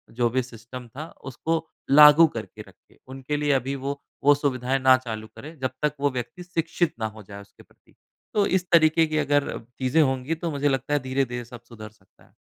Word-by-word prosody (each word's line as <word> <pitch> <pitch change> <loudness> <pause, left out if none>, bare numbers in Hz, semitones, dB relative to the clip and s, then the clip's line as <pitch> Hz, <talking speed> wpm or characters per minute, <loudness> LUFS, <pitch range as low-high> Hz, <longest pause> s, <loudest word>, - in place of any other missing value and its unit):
जो 120 0 +2
भी 130 +3 0
सिस्टम 120 +1 -11
था, 145 +7 -8 0.2
उसको 160 +5 -3 0.2
लागू 150 +3 +9
करके 115 -7 -8
रखे। - - -23
उनके 135 +3 -4
लिए 145 0 0
अभी 135 +1 -1
वो, 140 +1 -5 0.2
वो 145 +1 +6
सुविधाएँ 135 -2 -1
ना 130 0 +6
चालू 110 -1 -5
करे। 155 +3 -10
जब 130 -1 -1
तक 150 -1 +2
वो 145 - +2
व्यक्ति 130 +8 -6
शिक्षित 170 -1 -1
ना 110 - -1
हो 110 0 -12
जाए 100 +1 -10
उसके 100 - -18
प्रति। - - -29 0.4
तो 205 -1 +3
इस 185 -2 0
तरीके 160 -1 +5
की 155 0 -2
अगर 145 -1 0 0.2
चीज़ें 130 +5 +2
होंगी 135 +2 0
तो 165 0 -4
मुझे 145 0 0
लगता 135 +1 -1
है 145 - +3
धीरे-धीरे 130 -2 -2
सब 120 0 -12
सुधर 110 -2 -10
सकता 100 -3 -28
है। - - -28
135 Hz, 205 wpm, -24 LUFS, 125-150 Hz, 0.4 s, लागू